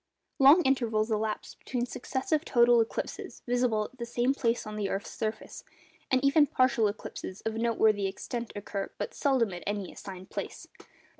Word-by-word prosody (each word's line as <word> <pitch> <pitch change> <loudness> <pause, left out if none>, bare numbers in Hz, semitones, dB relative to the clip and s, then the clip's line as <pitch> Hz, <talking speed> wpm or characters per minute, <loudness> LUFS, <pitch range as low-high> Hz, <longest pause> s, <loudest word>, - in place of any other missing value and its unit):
Long 285 +6 +8
intervals 230 -5 +1
elapse 215 0 -2
between 245 -1 -3
successive 265 +5 -2
total 240 -4 +5
eclipses 225 - -4
visible 245 -3 +1
at 250 +4 -11
the 235 - -3
same 240 +2 +1
place 235 -4 0
on 215 0 -6
the 205 -2 -2
earth's 195 +1 -3
surface, 220 0 -5 0.5
and 260 0 +2
even 290 +1 +5
partial 255 -4 +3
eclipses 200 -2 -6
of 225 - -2
noteworthy 220 -3 +2
extent 235 +4 -5
occur 200 -1 -4
but 475 - -4
seldom 255 -8 +1
at 175 - -6
any 205 -2 -2
assigned 190 -1 -10
place. - - -6
230 Hz, 160 wpm, -29 LUFS, 215-255 Hz, 0.5 s, Long